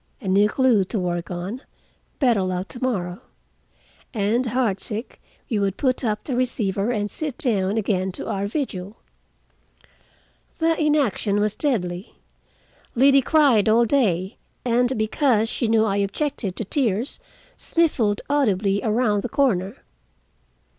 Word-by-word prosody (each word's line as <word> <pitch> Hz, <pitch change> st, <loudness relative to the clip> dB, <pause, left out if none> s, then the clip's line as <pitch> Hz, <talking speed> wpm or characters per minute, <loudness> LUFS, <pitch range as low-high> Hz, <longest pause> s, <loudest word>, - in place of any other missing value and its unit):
A 220 Hz, -, -8 dB
new 200 Hz, +3 st, +4 dB
clue 245 Hz, -5 st, +3 dB
to 215 Hz, -, -4 dB
work 175 Hz, -2 st, -2 dB
on. 185 Hz, +8 st, -5 dB, 0.6 s
Better 240 Hz, -7 st, +3 dB
luck 185 Hz, 0 st, -2 dB
to 245 Hz, -, -9 dB
morrow." 185 Hz, -9 st, -2 dB, 0.9 s
And 225 Hz, +4 st, +1 dB
heartsick 225 Hz, -1 st, -2 dB, 0.3 s
we 220 Hz, -5 st, -1 dB
would 200 Hz, -1 st, -1 dB
put 255 Hz, -2 st, 0 dB
up 210 Hz, -2 st, -1 dB
the 265 Hz, -, -3 dB
receiver 220 Hz, -5 st, -1 dB
and 210 Hz, -4 st, -1 dB
sit 300 Hz, -5 st, -4 dB
down 205 Hz, -4 st, 0 dB
again 190 Hz, -3 st, 0 dB
to -, -, -6 dB
our 200 Hz, 0 st, -2 dB
vigil. 205 Hz, -5 st, -4 dB, 1.6 s
The 325 Hz, 0 st, +2 dB
inaction 275 Hz, -9 st, +1 dB
was 210 Hz, 0 st, 0 dB
deadly. 190 Hz, -, -2 dB, 0.8 s
Liddy 275 Hz, +2 st, +5 dB
cried 260 Hz, -7 st, +4 dB
all 235 Hz, +2 st, +4 dB
day, 200 Hz, -8 st, +1 dB, 0.3 s
and, 245 Hz, +1 st, +2 dB
because 225 Hz, 0 st, +1 dB
she 240 Hz, -, -1 dB
knew 220 Hz, 0 st, +3 dB
I 200 Hz, -2 st, 0 dB
objected 200 Hz, -, -2 dB
to 225 Hz, -, -2 dB
tears, 235 Hz, +1 st, -1 dB, 0.4 s
sniffled 250 Hz, -11 st, +1 dB
audibly 205 Hz, -8 st, +1 dB
around 215 Hz, -2 st, +1 dB
the 245 Hz, -, -4 dB
corner. 215 Hz, -5 st, 0 dB
220 Hz, 135 wpm, -23 LUFS, 195-255 Hz, 1.6 s, Liddy